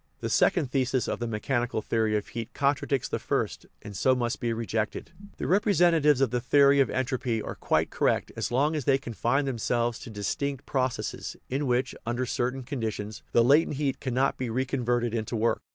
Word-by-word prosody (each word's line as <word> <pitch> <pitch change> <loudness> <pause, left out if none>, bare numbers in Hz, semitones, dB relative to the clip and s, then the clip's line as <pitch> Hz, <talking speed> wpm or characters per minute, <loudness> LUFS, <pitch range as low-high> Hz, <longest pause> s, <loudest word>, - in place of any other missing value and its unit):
The - - -3
second 150 -8 +2
thesis 130 -2 +1
of - - -2
the 120 - -2
mechan 120 +3 -1
ical 110 -2 -3
theory 110 -2 +1
of 105 - -5
heat 115 -1 -6
contradicts 140 -1 +1
the - - -3
first, - - -2 0.2
and 105 -1 -8
so 130 +6 +3
must 120 -1 -1
be 120 - -1
rejected. 110 -1 -3 0.3
The - - -4
representatives 170 - +3
of 130 -4 +2
the 125 -1 0
theory 140 +2 +5
of 135 - +4
entropy 125 -3 -1
are - - -5
quite - - 0
correct - - +1
as - - -3
long 145 +6 +2
as 150 -5 -3
they 135 -1 +4
confine 135 +2 -1
themselves 120 -2 -1
to - - -9
dis 105 -3 -2
tinct 140 -1 -3
processes, 130 -2 -2
in 140 +2 -1
which, 125 +1 +1
under 120 +3 -1
certain 125 +2 -2
conditions, 110 -5 -4
the 120 - +5
latent 145 +4 +4
heat 140 -2 -1
cannot 130 +1 0
be 130 -2 -2
reconverted 120 -1 0
into 115 0 -2
work. 115 +1 +1
125 Hz, 195 wpm, -27 LUFS, 115-140 Hz, 0.3 s, theory